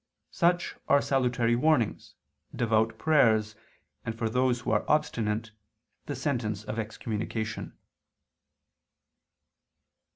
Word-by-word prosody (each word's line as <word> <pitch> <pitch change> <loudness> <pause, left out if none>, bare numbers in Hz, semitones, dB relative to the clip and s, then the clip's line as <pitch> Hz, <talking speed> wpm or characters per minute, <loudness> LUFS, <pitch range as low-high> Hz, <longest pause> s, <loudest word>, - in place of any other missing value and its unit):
Such 175 +1 +1
are 140 - +5
salutary 125 -4 +1
warnings, 125 -4 +1 0.4
devout 110 -1 +1
prayers, 110 -9 +3 0.5
and, 115 0 -4
for 115 -1 -1
those 125 0 +1
who - - -2
are 105 - +2
obstinate, 110 -7 0 0.6
the 145 - -3
sentence 120 -7 -2
of 110 +1 -4
excommunication. 110 0 -4
115 Hz, 95 wpm, -28 LUFS, 110-130 Hz, 0.6 s, are